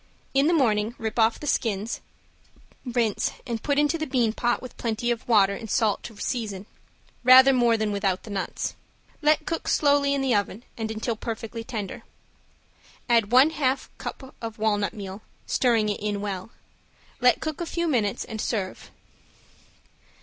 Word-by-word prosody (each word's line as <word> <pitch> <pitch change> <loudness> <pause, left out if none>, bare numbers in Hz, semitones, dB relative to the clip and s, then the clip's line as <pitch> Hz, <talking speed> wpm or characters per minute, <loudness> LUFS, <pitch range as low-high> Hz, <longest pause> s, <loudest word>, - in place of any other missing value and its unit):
In 275 +2 +4
the 340 - +3
morning 225 -6 +2
rip 225 +1 -3
off 225 0 +3
the - - -7
skins, 225 -6 -1 0.8
rinse 235 -4 0
and 230 -3 -3
put 285 -1 0
into 295 +3 +2
the 315 - -2
bean 245 -5 +1
pot 240 +1 0
with 255 - -10
plenty 235 +1 -1
of 235 - -4
water 200 -4 +5
and 225 +2 -7
salt 220 -3 +1
to 225 -3 -10
season, 210 -6 -3 0.6
rather 260 +2 +8
more 240 -2 +3
than 215 -1 -1
without 195 -2 -1
the 215 - -9
nuts. 195 -2 -3 0.5
Let 305 0 +3
cook 335 -3 -3
slowly 285 -1 +3
in 275 - -1
the 260 -2 +2
oven 205 +2 -1
and 220 -1 -4
until 220 +1 -2
perfectly 225 0 -5
tender; 225 0 -5 1.1
add 230 -3 +3
one 260 +5 +6
half 270 -4 -1
cup 265 -1 -7
of 225 -1 -6
walnut 210 -1 0
meal, 195 0 -7 0.2
stirring 230 -4 +2
it 205 - -2
in 205 -1 -2
well; 195 -1 -4 0.7
let 250 -1 +4
cook 315 +1 -4
a 340 - -3
few 340 0 -1
minutes, 225 -9 0
and 220 -3 -5
serve. 195 -5 -3
230 Hz, 165 wpm, -25 LUFS, 210-260 Hz, 1.1 s, rather